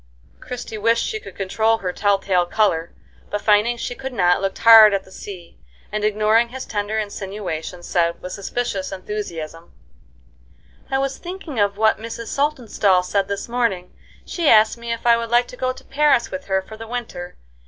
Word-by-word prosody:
Christie 245 -3 -7
wished 230 +2 +2
she 435 - -3
could - - -12
control 220 +3 +1
her 185 -4 -4
tell 200 0 +2
tale 185 -3 +1
color, 170 -6 +1 0.4
but 205 - -2
finding 215 +3 +3
she 245 - -4
could 265 +1 -7
not, 180 -4 +3
looked 195 -1 -2
hard 220 -3 +8
at 195 - -2
the 190 - -19
sea, 185 -4 -10 0.3
and, 210 0 -2
ignoring 215 +2 +3
his 260 +2 -7
tender 210 +1 -2
insinuation, 195 -5 -5
said, 170 -1 0
with 180 - -8
suspicious 200 -2 -3
enthusiasm: 170 -5 -6 1.2
"I 270 - +1
was 270 0 -2
thinking 345 - -6
of 200 -1 +1
what 220 0 +3
Mrs. 230 +1 -7
Saltonstall 235 -10 +1
said 195 +1 0
this 200 0 -4
morning. 230 -7 -1 0.3
She 335 -4 0
asked 215 0 +6
me 235 0 -6
if 230 0 -4
I 235 -1 +6
would 230 0 -4
like 240 +1 +3
to - - -9
go 255 +1 -1
to 260 +1 -12
Paris 290 -4 +2
with 280 0 -6
her 190 -1 0
for 220 - -11
the 225 0 -9
winter. 220 -7 -6
215 Hz, 185 wpm, -21 LUFS, 190-240 Hz, 1.2 s, hard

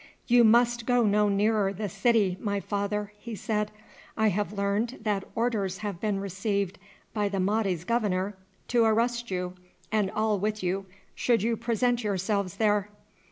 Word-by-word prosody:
"You 245 -1 +5
must 235 +1 +4
go 245 -1 +4
no 210 0 +3
nearer 205 0 +2
the 205 +2 -4
city, 200 -1 +2
my 200 -1 -1
father," 205 +1 -2
he 230 +1 -6
said. 210 0 -1 0.5
"I 220 -1 +4
have 205 +2 -1
learned 205 +4 -1
that 205 -3 0
orders 215 -5 0
have 200 -4 -3
been 210 -2 0
received 200 0 -2 0.3
by 210 -2 0
the 195 -1 -2
Mahdi's 195 -3 0
governor 205 -2 0 0.3
to 240 -1 +4
arrest 235 +2 +1
you 180 -1 -2 0.4
and 210 -3 +2
all 215 -1 0
with 210 +1 -2
you 190 +2 -1 0.3
should 230 -5 +1
you 230 +1 +1
present 240 +1 0
yourselves 200 -2 -1
there. 210 -2 +2
210 Hz, 160 wpm, -28 LUFS, 195-225 Hz, 0.5 s, You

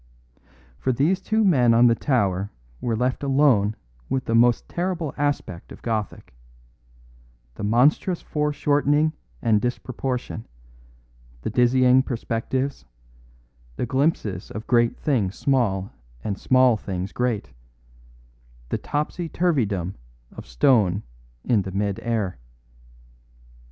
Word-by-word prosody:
For 130 - 0
these 155 +10 +1
two 220 +3 +1
men 125 - +4
on 120 +1 +6
the 120 - +6
tower 100 -7 0 0.3
were 115 -2 -1
left 125 +3 -1
alone 135 -7 +3 0.3
with 130 - -1
the 115 - -1
most 120 +1 +4
terrible 175 -4 -2
aspect 145 -11 -2
of - - -12
Gothic; 110 - -3 1.2
the 80 - -8
monstrous 135 - +3
foreshortening 150 0 +1 0.3
and 105 -2 +3
disproportion, 125 -1 -3 1.0
the - - -2
dizzy 125 +2 +4
perspectives, 130 - -3 0.9
the - - -2
glimpses 130 - -1
of 110 +1 -7
great 120 -1 +2
things 110 -10 0
small 105 -9 0 0.3
and 100 - -2
small 130 +1 +4
things 95 -1 -4
great; 125 -4 -2 1.2
a - - 0
topsy 150 +3 -3
turvydom 110 - 0 0.4
of - - -11
stone 95 - +3 0.4
in 110 -4 +2
the 95 - -6
mid 100 0 -1
air. 105 - -2
120 Hz, 110 wpm, -24 LUFS, 105-140 Hz, 1.2 s, on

